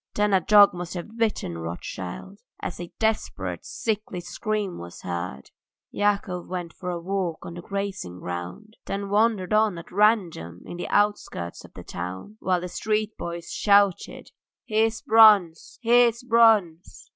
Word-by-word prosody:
Then 210 -1 +2
a 190 - +4
dog 205 +2 +7
must 175 0 -6
have 180 +6 -7
bitten 215 - -1
Rothschild, 90 - -7 0.2
as - - -5
a 175 -1 -7
desperate, 220 -1 -2
sickly 215 -4 -3
scream 205 +2 -3
was 85 0 -10
heard. 85 -6 -5 0.4
Yakov 200 -3 -1
went 175 -2 -5
for 180 - -6
a 175 -1 -3
walk 180 -2 -3
on 170 - -7
the 175 - -8
grazing 195 - -5
ground, 90 - -7
then 200 0 -3
wandered 210 -2 +2
on 215 -4 +3
at 170 - -10
random 180 - +1
in 175 - -8
the 175 - -4
outskirts 205 - -1
of - - -16
the - - -9
town, 90 - -7
while 180 -2 0
the 180 - -4
street 215 +3 -2
boys 170 0 -6
shouted: 200 -3 +2 0.3
"Here's 220 0 +1
Bronze! 210 -7 +5
Here's 235 0 +4
Bronze!" 220 -8 +3
195 Hz, 150 wpm, -25 LUFS, 170-215 Hz, 0.4 s, dog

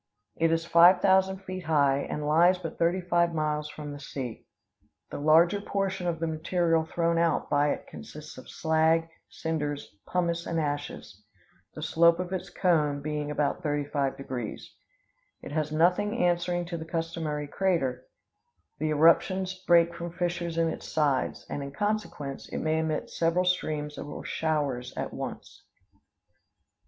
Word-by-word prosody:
It 165 0 +2
is 165 0 0
five 175 +2 +7
thousand 190 0 +3
feet 185 -2 -6
high, 140 -3 +3
and 150 +1 -4
lies 170 +5 +5
but 165 -3 -7
thirty 170 +3 +2
five 170 -1 +1
miles 150 -1 -1
from 150 0 -7
the 145 - -8
sea. 130 -4 -6 0.6
The - - -5
larger 165 +6 +4
portion 195 -3 -2
of 170 -1 0
the 165 - -1
material 165 +1 +1
thrown 170 +1 0
out 170 0 +1
by 145 0 +3
it - - -3
consists 150 0 -10
of - - -13
slag, 160 +1 +2 0.2
cinders, 150 -5 -3
pumice, 170 -1 -1
and 165 - -1
ashes, 145 -9 -4 0.5
the 155 - -6
slope 165 +1 +4
of 180 +1 -3
its 185 0 -4
cone 155 -6 +1
being 150 0 -3
about 150 +3 -1
35 145 -3 -1
degrees. 125 -5 -6 0.7
It - - -8
has 155 0 -1
nothing 180 +8 +2
answering 175 -2 +1
to 170 0 -5
the 160 - -6
customary 165 -3 -3
crater; 140 -8 -1 0.7
the 155 - 0
eruptions 175 +5 +3
break 170 -1 +5
from 170 0 -6
fissures 175 -1 -2
in 165 0 +3
its - - -6
sides; 145 -4 0
and, 145 - -4
in 140 0 -6
consequence, 205 -10 -3
it - - -4
may 160 0 0
emit 160 -1 -2
several 170 +2 +1
streams 155 -4 -1
or 145 - -7
showers 145 -6 -2
at - - -3
once. - - -7
165 Hz, 155 wpm, -28 LUFS, 150-175 Hz, 0.7 s, five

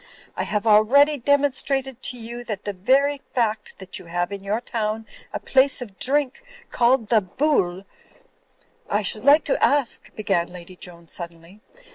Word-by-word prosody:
I - - -2
have 210 +1 -2
already 270 +8 +5
demonstrated 270 -1 +1
to 250 - -3
you 235 +1 -7
that 210 -4 -5
the 205 - -3
very 270 +9 +2
fact 220 -3 -1
that 190 -1 -7
you - - -13
have 175 +2 -2
in 200 -1 -6
your 205 +3 -1
town 225 -2 -3 0.3
a - - -4
place 270 +1 +3
of 210 -7 -9
drink 280 - +2 0.3
called 240 -2 +2
the 225 -3 +4
Bool—" 190 -4 0 1.0
"I 205 +1 0
should 210 +2 -1
like 290 +2 +6
to - - -1
ask—" 285 -4 +1
began 195 -5 0
Lady 180 0 -11
Joan, 170 -2 -9
suddenly. 170 +4 -7
220 Hz, 160 wpm, -23 LUFS, 190-270 Hz, 1.0 s, like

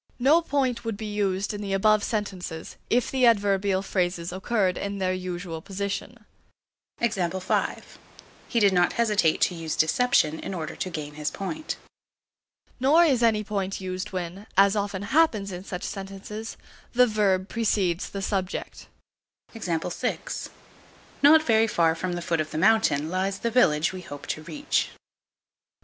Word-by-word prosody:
No 285 +7 +5
point 260 -7 0
would 225 -3 -3
be 220 - -6
used 200 -1 0
in 205 - -5
the 200 -1 -3
above 215 +2 +3
sentences, 185 -6 -4
if 245 0 +2
the 260 -2 +4
adverbial 200 -3 +2
phrases 175 -3 -1
occurred 190 0 0
in 200 0 -4
their 185 -1 0
usual 180 -2 -5
position. 200 +5 -5 0.7
He 235 - +2 1.5
did 200 -3 +4
not 175 -1 +3
hesitate 210 -8 +2
to - - +3
use 165 -2 -4
deception 160 -3 +2
in 195 - -5
order 160 -3 -5
to 185 - -3
gain 150 -4 -6
his 150 0 -2
point. 310 - -5 1.0
Nor 295 +7 +5
is 265 -7 +2
any 220 -2 +3
point 195 -2 -3
used 185 +2 -4
when, 185 +2 -5
as 195 +1 +6
often 200 -1 -2
happens 215 -6 +2
in 180 0 -6
such 180 -2 -6
sentences, 195 +3 -6 0.4
the 250 +1 +6
verb 200 -4 +1
precedes 200 -6 0
the 195 -1 -5
subject. 190 -2 -3 0.7
Not 230 - -1
very 225 -4 +4
far 165 -6 +3
from 175 +2 -3
the 175 0 -4
foot 165 -2 0
of 155 - -4
the - - -5
mountain 165 -6 +3
lies 190 +1 -1
the 235 +3 -2
village 160 -10 +3
we 185 - -6
hope 145 -5 -9
to 155 - -10
reach. 290 - -1
195 Hz, 150 wpm, -26 LUFS, 180-225 Hz, 1.5 s, as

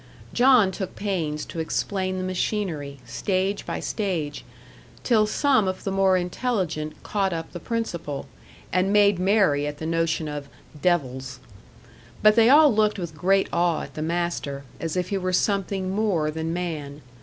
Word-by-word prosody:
John 245 -6 +5
took 190 -1 -5
pains 165 -7 -2
to 165 - -7
explain 185 +3 -1
the 185 - -2
machinery, 180 -6 -2
stage 195 0 -1
by - - -3
stage, 175 -9 -3 0.6
till 220 -4 +3
some 260 -2 +2
of 185 0 -3
the 195 - -2
more 190 -1 +3
intelligent 175 -5 -2
caught 195 -3 0
up 165 -1 -5
the 175 - -7
principle, 170 -10 -3 0.5
and 185 +2 +2
made 205 -2 +4
merry 185 -7 +3
at 145 0 -5
the 160 - -6
notion 165 -1 0
of 145 -1 -6 0.3
"devils." 130 -7 0 0.8
But 215 0 +7
they 230 0 +6
all 295 -1 +7
looked 215 0 +2
with 170 -4 -5
great 195 +4 +2
awe 170 -1 +1
at - - -10
the 155 - -5
master, 165 -4 -2 0.2
as 165 +1 -3
if 180 -1 -1
he 200 -2 0
were 185 0 -2
something 195 -1 0
more 190 -7 +1
than 160 +1 -3
man. 155 -5 -4
185 Hz, 160 wpm, -24 LUFS, 160-200 Hz, 0.8 s, But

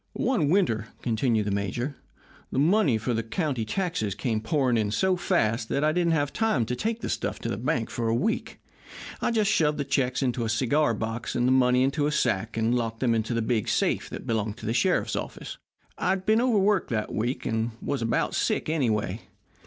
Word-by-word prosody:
"One 205 - +1
winter," 135 - +2 0.2
continued 115 -2 +1
the 105 - -1
major, 100 +8 -2 0.6
"the - - -3
money 155 - +3
for 115 +3 -2
the 115 - 0
county 130 +1 -2
taxes 165 - -2
came 110 0 -1
pouring 125 +1 +1
in 110 -2 +1
so 185 - +2
fast 115 -10 0
that 140 - 0
I 155 - +3
didn't 170 0 +1
have 145 -3 0
time 220 - +1
to 125 - -2
take 225 - -2
the - - -3
stuff - - -2
to - - -3
the - - -1
bank 120 +1 -1
for 115 -1 -2
a 115 - +2
week. 215 - -1 0.6
I - - +1
just 215 -3 +2
shoved 150 -2 +2
the 145 - -2
checks 130 -1 0
into 125 -2 0
a 115 - -2
cigar 130 +3 +2
box 115 +2 -4
and 120 0 +2
the - - +3
money 125 -1 +4
into 145 +2 +1
a - - 0
sack, 110 -5 0
and 115 +1 +1
locked 115 -2 -1
them 120 -3 +2
in 115 - +2
the 115 +1 -2
big 110 -2 0
safe - - 0
that - - -7
belonged 110 -1 -1
to - - -9
the 115 - 0
sheriff's 120 - +1
office. - - -6 0.4
"I 180 - 0
had 190 0 0
been 220 +3 +4
overworked 210 -6 +2
that 110 -3 -2
week, 120 +5 -2
and 115 -1 0
was 140 -3 -2
about 115 0 0
sick, - - 0
anyway. 110 - 0
125 Hz, 215 wpm, -26 LUFS, 115-155 Hz, 0.6 s, money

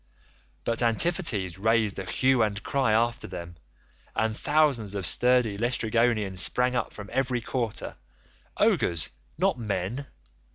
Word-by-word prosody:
But 115 +1 -1
Antiphates 115 - +1
raised 110 -1 +2
a 95 - -5
hue 130 -2 +3
and 105 -1 0
cry 135 -5 +1
after 115 +1 +1
them, 85 0 -8 0.6
and 110 -1 0
thousands 140 -9 +1
of 95 -3 -3
sturdy 125 -1 +2
Laestrygonians 115 -4 +1
sprang 125 +6 +3
up 125 - -1
from 105 -1 -9
every 130 -2 +1
quarter—ogres, 110 - -2 0.3
not 125 - +1
men. 110 +5 -3
115 Hz, 120 wpm, -27 LUFS, 100-125 Hz, 0.6 s, hue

